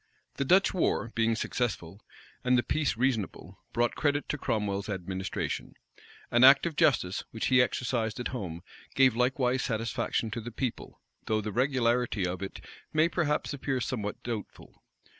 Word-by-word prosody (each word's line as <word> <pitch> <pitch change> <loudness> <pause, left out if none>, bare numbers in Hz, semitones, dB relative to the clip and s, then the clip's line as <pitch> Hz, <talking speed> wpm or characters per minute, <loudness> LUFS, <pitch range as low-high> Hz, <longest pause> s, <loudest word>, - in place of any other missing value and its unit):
The 140 - 0
Dutch 190 +8 +4
war, 160 -9 0
being 115 0 +2
successful, 105 -6 -3 0.4
and 125 0 +4
the 120 - +2
peace 155 -6 0
reasonable 120 -6 -2
brought 120 0 +1
credit 145 -1 0
to 150 - -1
Cromwell's 100 -3 -1
administration. 95 0 -4 0.6
An 120 +1 +4
act 135 +3 +8
of 170 -3 -2
justice, 95 -12 +2
which 110 - -3
he 125 -1 +6
exercised 120 -3 -1
at 125 - -2
home, 90 -9 -5 0.3
gave 130 -3 +5
likewise 125 +1 +1
satisfaction 115 -1 -1
to 115 - -4
the 120 - -6
people: 120 +1 -4 0.3
though 110 -1 +1
the 105 0 -4
regularity 120 -4 +1
of 90 +1 -3
it 95 - -6 0.3
may 155 +2 +3
perhaps 150 -4 0
appear 135 -1 -2
somewhat 110 -4 -3
doubtful. 115 -4 -7
120 Hz, 155 wpm, -29 LUFS, 105-130 Hz, 0.6 s, act